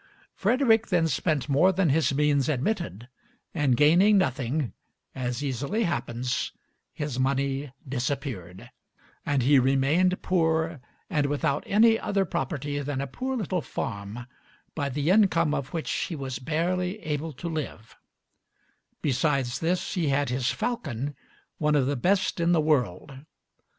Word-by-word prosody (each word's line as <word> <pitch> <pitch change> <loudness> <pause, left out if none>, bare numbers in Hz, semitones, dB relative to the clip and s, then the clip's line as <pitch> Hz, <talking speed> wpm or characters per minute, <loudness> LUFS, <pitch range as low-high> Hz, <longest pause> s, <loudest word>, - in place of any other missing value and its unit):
Frederick 230 +1 +3
then 175 -3 +2
spent 155 -3 0
more 150 +7 +4
than 185 -3 +1
his 155 +2 +2
means 145 0 +2
admitted, 145 - -2 0.5
and 140 -7 +2
gaining 175 +8 +5
nothing, 135 - 0 0.4
as 125 0 -3
easily 140 - -1
happens, 125 - -2 0.4
his 150 -4 -4
money 135 +1 0 0.2
disappeared, 120 - -4 0.6
and 140 -3 +2
he 140 +2 +5
remained 140 +8 +2
poor 160 -4 +1 0.3
and 145 -2 +1
without 140 0 0
any 225 +2 +5
other 195 -1 0
property 145 -1 -3
than 145 -1 -3
a 140 - -1
poor 260 - -3
little 185 -5 -1
farm, 115 -3 -5 0.5
by 140 -3 -2
the 145 +5 0
income 170 -7 +4
of 140 -3 -3
which 165 -2 -3
he 170 - -2
was 130 -4 -5
barely 180 +6 -1
able 155 +1 -2
to 155 +5 -7
live; 150 -8 -5 1.1
besides 135 -3 +1
this, 175 +2 -1
he 175 -5 0
had 140 0 +1
his 125 0 0
falcon, 145 - -3 0.5
one 150 -1 +2
of 140 -3 +3
the 140 +2 0
best 185 +8 +1
in 170 +1 +3
the 165 - +4
world. 140 - 0
145 Hz, 140 wpm, -27 LUFS, 135-170 Hz, 1.1 s, gaining